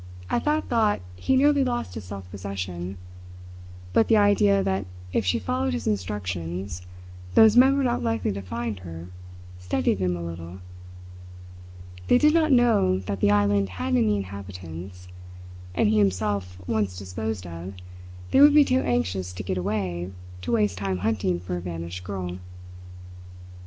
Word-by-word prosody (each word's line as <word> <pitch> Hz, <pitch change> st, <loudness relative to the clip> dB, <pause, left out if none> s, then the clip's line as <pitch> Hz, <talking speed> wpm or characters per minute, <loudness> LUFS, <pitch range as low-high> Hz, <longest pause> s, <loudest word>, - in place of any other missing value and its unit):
At -, -, 0 dB
that 300 Hz, +1 st, +1 dB
thought 220 Hz, -3 st, +2 dB, 0.2 s
he 265 Hz, -, +1 dB
nearly 285 Hz, +1 st, +4 dB
lost 240 Hz, -, -2 dB
his 105 Hz, -2 st, -7 dB
self 95 Hz, 0 st, -8 dB
possession. 95 Hz, -1 st, -5 dB, 1.0 s
But 225 Hz, -, +4 dB
the 225 Hz, -, +5 dB
idea 205 Hz, -1 st, +4 dB
that 95 Hz, 0 st, -1 dB, 0.3 s
if 105 Hz, -, 0 dB
she 90 Hz, -, +3 dB
followed 90 Hz, -4 st, -1 dB
his 80 Hz, -, -3 dB
instructions 90 Hz, -2 st, -3 dB, 0.5 s
those 220 Hz, 0 st, +7 dB
men 265 Hz, +3 st, +6 dB
were 280 Hz, -, +1 dB
not 240 Hz, -2 st, 0 dB
likely 115 Hz, -4 st, 0 dB
to 100 Hz, 0 st, -4 dB
find 110 Hz, +1 st, -4 dB
her 85 Hz, -1 st, -9 dB, 0.5 s
steadied 90 Hz, +1 st, 0 dB
him 90 Hz, -1 st, 0 dB
a 85 Hz, -, -6 dB
little. 85 Hz, +1 st, -7 dB, 1.5 s
They -, -, +6 dB
did 300 Hz, +4 st, +4 dB
not 320 Hz, -2 st, +3 dB
know 230 Hz, -, +4 dB
that 95 Hz, +1 st, -4 dB
the 100 Hz, -, +3 dB
island 100 Hz, -1 st, +3 dB
had 90 Hz, +2 st, -2 dB
any 110 Hz, -4 st, +3 dB
inhabitants; 90 Hz, -2 st, -8 dB, 0.7 s
and -, -, +3 dB
he 105 Hz, 0 st, +3 dB
himself 100 Hz, -2 st, 0 dB
once 105 Hz, -3 st, -1 dB
disposed 100 Hz, +1 st, -4 dB
of, 85 Hz, +3 st, -7 dB, 0.6 s
they -, -, +5 dB
would 295 Hz, +1 st, +8 dB
be 295 Hz, -1 st, +7 dB
too 255 Hz, 0 st, +2 dB
anxious 95 Hz, -7 st, -1 dB
to 90 Hz, -, -6 dB
get 95 Hz, -1 st, -2 dB
away 90 Hz, -2 st, -2 dB, 0.3 s
to 90 Hz, -, -4 dB
waste 105 Hz, -5 st, +1 dB
time 95 Hz, -2 st, -1 dB
hunting 95 Hz, -5 st, 0 dB
for 90 Hz, 0 st, -4 dB
a -, -, -5 dB
vanished 85 Hz, +1 st, -6 dB
girl. 90 Hz, -2 st, -5 dB
95 Hz, 155 wpm, -25 LUFS, 90-115 Hz, 1.5 s, would